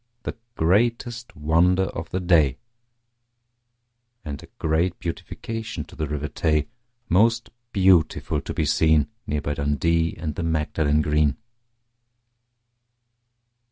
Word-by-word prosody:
The - - -4 0.2
greatest 115 +7 +1
wonder 85 +5 +3
of 80 -3 -5
the 95 - -2
day, 85 -7 +3 1.7
And 70 -3 -5
a - - -13
great 80 +3 0
beautification 110 +3 -5
to - - -15
the 80 -1 -2
River 75 0 -3
Tay, 75 -1 0 0.4
Most 115 +6 +3 0.2
beautiful 95 -5 +3
to - - -6
be 80 - +1
seen, 75 0 +3 0.2
Near 75 0 -1
by 75 - -2
Dundee 80 +4 +1
and 80 -1 -3
the 80 - -4
Magdalen 75 -2 +1
Green. 75 -1 +2
80 Hz, 115 wpm, -24 LUFS, 75-90 Hz, 1.7 s, wonder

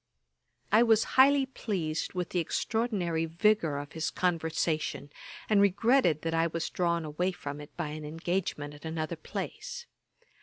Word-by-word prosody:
I 215 +3 +6
was 225 -2 +5
highly 275 +1 +6
pleased 180 -11 -3
with 180 -2 -2
the 180 - 0
extraordinary 175 -3 -1
vigour 170 -2 +2
of 145 0 -6
his 160 0 -2
conversation, 160 -4 -1 0.4
and 210 -2 +4
regretted 200 - +3
that 165 0 -1
I 165 0 +3
was 165 0 -3
drawn 170 -2 0
away 175 +5 -1
from 145 -4 -7
it 145 - -13
by 165 -3 -2
an 155 +1 -6
engagement 165 -1 -3
at 145 - -14
another 160 0 -3
place. 480 - -6
170 Hz, 150 wpm, -30 LUFS, 155-205 Hz, 0.4 s, I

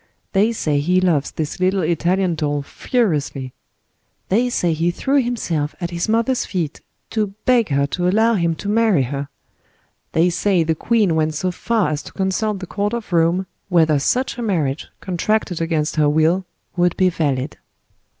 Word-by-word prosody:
They 210 +3 +3
say 150 -10 0
he 180 +5 +2
loves 165 -6 +1
this 155 +1 -4
little 185 +1 +1
Italian 175 +2 +1
doll 145 -2 -1
furiously. 145 - -1 0.8
They 235 +6 +2
say 175 -8 +1
he 165 +2 +1
threw 270 +10 +1
himself 170 - -2
at 175 -1 -3
his 170 +4 -2
mother's 230 +3 +1
feet, 170 -6 -3 0.3
to 210 -3 -1
beg 245 -5 +3
her 140 0 +2
to 175 +5 -1
allow 220 +5 +3
him 170 -5 +1
to 200 - -7
marry 210 -8 +3
her. 140 +2 -4 0.8
They 170 +2 +3
say 185 -1 +2
the 160 0 +1
queen 210 +2 +1
went 155 -1 0
so 185 +4 -1
far 220 -1 0
as 150 -1 -2
to - - -12
consult 195 +2 -1
the 185 - -6
court 205 +4 -2
of 220 -6 -6
Rome, 170 +3 +2 0.2
whether 160 -5 +4
such 250 - 0
a - - -2
marriage, 160 - -1
contracted 185 -1 -1
against 160 -2 -1
her 150 -1 +4
will, 160 +5 +2 0.3
would 175 -1 +1
be 185 -1 +4
valid. 145 -5 -1
175 Hz, 170 wpm, -20 LUFS, 155-205 Hz, 0.8 s, whether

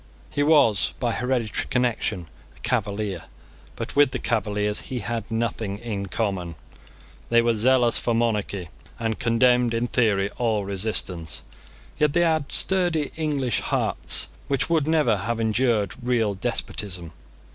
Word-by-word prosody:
He 145 - -1
was, 145 -9 +4
by 120 -2 0
hereditary 125 -2 -1
connection, 120 -8 0 0.3
a - - -18
Cavalier: 100 -3 -2 0.5
but - - -6
with 145 -1 +6
the - - -3
Cavaliers 105 -2 0
he 125 -2 -5
had 115 0 -4
nothing 115 -3 -2
in 105 -3 -4
common. 95 -5 -2 0.7
They 115 0 +4
were 115 0 +3
zealous 120 +2 +3
for 120 - 0
monarchy, 105 -6 -1 0.3
and 115 -1 -2
condemned 120 0 +3
in 115 +1 0
theory 100 -5 +1
all 110 -4 +1
resistance. 95 -4 -2 0.6
Yet 150 -2 +3
they 175 - +3
had 160 -4 +1
sturdy 175 -6 +2
English 145 -7 0
hearts - - +1 0.2
which 140 +4 0
would 155 -3 +2
never 150 -9 +3
have 115 +4 -2
endured 110 -2 +1
real 120 -4 +1
despotism. 95 -5 -3
115 Hz, 135 wpm, -24 LUFS, 105-125 Hz, 0.7 s, with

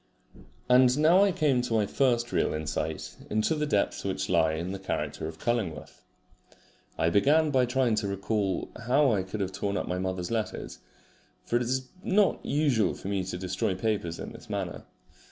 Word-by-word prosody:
And 125 +1 +5
now 165 +6 +6
I 200 - +3
came 150 -8 +2
to 120 -2 -2
my 105 -2 +3
first 120 +1 +1
real - - +1
insight 75 0 -4
into 110 +9 +1
the 150 -1 -1
depths 105 -8 0
which 95 -1 -2
lie 80 -3 +3
in 85 +4 -3
the 95 - -5
character 85 -4 -3
of 80 0 -8
Cullingworth. 110 -5 -3 1.0
I 80 +1 +2
began 150 - +4
by 130 -3 +3
trying 125 -2 +1
to 105 -1 -1
recall 100 -1 -1 0.2
how 135 +1 +4
I 100 - +1
could 95 +3 -5
have 95 -1 -2
torn 100 +1 -2
up - - -3
my 90 0 -2
mother's 95 0 -3
letters, 110 -2 -3 0.7
for 120 - +1
it - - -1
is 130 +1 -2
not 195 -2 +2
usual 140 -7 +1
for 95 - -7
me 100 -2 0
to 90 -1 -4
destroy 95 +1 -1
papers 100 -6 -2
in - - -7
this - - -13
manner. - - -4
110 Hz, 185 wpm, -28 LUFS, 95-130 Hz, 1.0 s, now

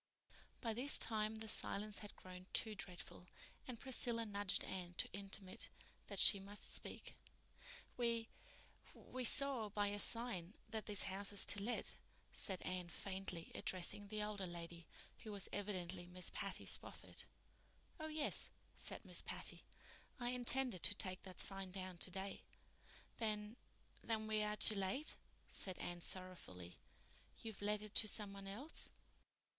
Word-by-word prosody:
By 230 -3 0
this 255 +6 +6
time 215 -1 +2
the 220 0 -4
silence 210 -1 +3
had 210 - -9
grown 185 0 -10
too 220 - +2
dreadful, 180 -2 -6 0.4
and 245 -3 -5
Priscilla 240 -3 +1
nudged 205 -2 +1
Anne 180 -2 -4
to - - +2
intimate 195 -1 -2 0.4
that - - -4
she 200 - +8
must 200 +2 -3
speak. - - -2 0.8
"We—we—saw 240 +1 +1
by 205 0 +2
your 205 0 -1
sign 220 -6 +2 0.2
that 220 -1 -2
this 205 -2 +9
house 195 +1 -2
is 200 - +2
to 205 - +3
let," 235 +4 +1 0.4
said 190 -2 -3
Anne 180 -1 -2
faintly, 190 -3 -4
addressing 200 +3 0
the 210 0 -1
older 205 -3 -2
lady, 170 -1 -7 0.3
who 215 - -6
was 200 -2 -1
evidently 185 -3 -2
Miss 180 0 -1
Patty - - -2
Spofford. - - -1 0.7
"Oh, 315 - -3
yes," 310 -1 0 0.3
said - - -5
Miss - - +2
Patty. - - -1 0.6
"I 240 0 0
intended 250 -4 +3
to 205 - +3
take 185 -2 0
that 185 -2 -9
sign 195 -1 +1
down 185 -1 -5
today." 190 +2 -1 0.8
"Then—then 220 0 -3
we 215 0 +2
are 210 0 +1
too 215 - +9
late," 200 +9 +1 0.3
said 185 -2 -3
Anne 175 0 -4
sorrowfully. 170 - -4 0.6
"You've 220 -3 -6
let 210 +1 +2
it 215 -1 -8
to 215 - +5
some 205 -1 +3
one 195 0 -7
else?" 245 +11 -5
205 Hz, 140 wpm, -42 LUFS, 185-220 Hz, 0.8 s, this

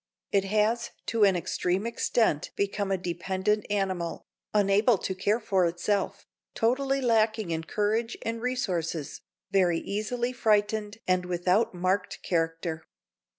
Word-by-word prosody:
It 195 -1 +2
has 215 +4 +1 0.2
to 225 -2 +1
an 195 -2 +4
extreme 180 +3 -1
extent 230 -8 +1
become 200 0 -1
a 190 - +2
dependent 190 +4 -1
animal, 190 -4 -2 0.3
unable 205 +2 +4
to 190 - -3
care 200 +4 +1
for 195 -5 +2
itself, 195 +3 -1 0.3
totally 270 +4 +1
lacking 220 -5 +2
in 160 0 -2
courage 220 +5 0
and 230 0 -3
resources, 180 - -2 0.3
very 180 -4 +3
easily 235 +7 -2
frightened 215 -2 +1
and 185 -1 +2
without 180 +4 +1
marked 185 +2 -1
character. 165 -1 -1
200 Hz, 125 wpm, -28 LUFS, 180-220 Hz, 0.3 s, an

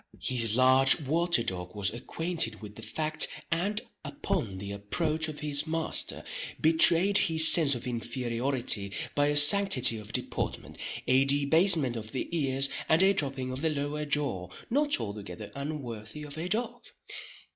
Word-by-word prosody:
His 115 -4 +3
large 130 +3 +4
water 160 -1 0
dog 90 -3 -6
was 100 0 0
acquainted 125 -1 -1
with 105 -1 -11
the 115 - -10
fact, 155 +5 0 0.2
and 195 +5 -1 0.2
upon 185 - -4
the 100 +1 -7
approach 155 - -2
of 155 -1 -8
his 150 0 +3
master, 165 0 0 0.4
betrayed 170 +5 +5
his 160 0 +3
sense 150 -5 +5
of 120 +2 -7
inferiority 120 -2 -1 0.2
by 145 0 +1
a 145 0 +1
sanctity 145 - +4
of 105 - -12
deportment, - - -4 0.3
a 130 +1 +3
debasement 145 0 +2
of 110 -1 -8
the 130 - -4
ears, 135 -3 +1 0.2
and 160 +4 +4
a 195 +1 +4
dropping 135 -7 -2
of 130 +1 -6
the 160 - 0
lower 150 0 -4
jaw 140 -12 -2 0.2
not 290 +3 +1
altogether 100 -2 -8
unworthy 140 -3 -6
of 145 -1 -9
a 165 +3 -5
dog. 235 +4 -3
140 Hz, 150 wpm, -28 LUFS, 115-160 Hz, 0.4 s, betrayed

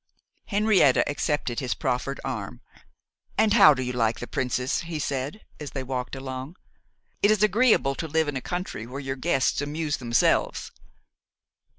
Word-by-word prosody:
Henrietta 205 - +3
accepted 145 -4 -1
his 130 -3 -2
proffered 135 0 -2
arm. - - -5 0.8
'And 215 -1 +4
how 175 -10 +8
do 130 - -3
you 125 0 -3
like 115 -2 0
the - - -5
princess?' 125 +1 -1
he 170 -2 -5
said, 140 +6 -3 0.2
as 145 -3 -7
they 135 - -3
walked 130 0 -4
along. 130 +3 -6 0.7
'It 205 - +4
is 215 -1 +3
agreeable 215 - +3
to 160 - -5
live 160 0 +1
in 145 - -3
a 130 - -2
country 175 - -5
where 130 +3 -6
your 135 -1 -4
guests 135 -1 +1
amuse 150 +1 -2
themselves. 120 -2 +1
140 Hz, 160 wpm, -25 LUFS, 130-165 Hz, 0.8 s, how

